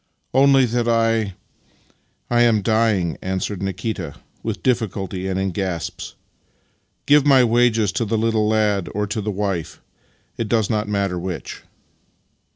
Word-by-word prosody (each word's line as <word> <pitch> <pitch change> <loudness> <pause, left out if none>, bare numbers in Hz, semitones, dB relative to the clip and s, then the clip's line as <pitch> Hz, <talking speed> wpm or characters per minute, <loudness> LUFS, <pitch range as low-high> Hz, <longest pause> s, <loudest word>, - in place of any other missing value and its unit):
" - - -50
" - - -48
Only 135 0 +5
that 120 0 -1
I 115 -4 +1 0.4
— - - -39
I 120 0 +4
am 115 -4 +3
dying," 110 -7 +1
answered 95 +1 -3
Nikita 95 -4 -4 0.3
with - - -4
difiiculty 95 -6 -1
and 95 0 -1
in 95 0 -1
gasps. 90 -3 -4 0.5
" - - -45
Give 145 0 +5
my 135 -3 +5
wages 115 -3 +3
to 115 - -1
the 110 +1 -1
little 110 -1 +1
lad 105 -3 +1
or 105 0 0
to 105 +2 -3
the 105 - -3
wife 95 -5 -3 0.3
— - - -40
it 115 -2 -2
does 110 -4 +1
not 105 -1 -1
matter 100 -3 -1
which." 85 -4 -6
105 Hz, 160 wpm, -21 LUFS, 95-115 Hz, 0.5 s, Only